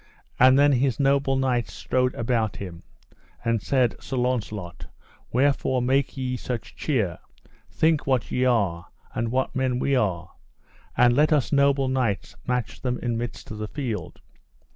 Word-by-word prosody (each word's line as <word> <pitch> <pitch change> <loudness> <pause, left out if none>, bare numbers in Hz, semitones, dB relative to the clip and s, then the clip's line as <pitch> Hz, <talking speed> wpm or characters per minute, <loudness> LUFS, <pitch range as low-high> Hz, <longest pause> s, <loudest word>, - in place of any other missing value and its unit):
And 130 +1 +7
then 145 +1 +5
his 130 0 +1
noble 135 -1 +2
knights 130 -3 0
strode 125 0 0
about 115 -3 0
him, 90 -4 -8 0.6
and 115 -2 +1
said: 125 -2 +1
Sir 135 - -5
Launcelot, 110 -8 -2 0.4
wherefore 130 0 +2
make 135 +3 +1
ye 130 -1 -2
such 120 -2 -5
cheer, 110 - -1 0.5
think 160 -3 +1
what 130 -4 0
ye 125 - +1
are, 100 -9 +1 0.3
and 115 0 -1
what 130 +2 -1
men 130 -1 0
we 140 +2 +1
are, 95 -9 -1 0.7
and 120 0 +5
let 150 +3 +3
us 150 -4 +2
noble 140 -1 +3
knights 125 -6 -1
match 125 -1 -2
them 125 -1 -1
in 120 -2 -2
midst 120 0 -5
of 105 - -6
the 105 - -3
field. 115 - -5
125 Hz, 155 wpm, -25 LUFS, 115-135 Hz, 0.7 s, And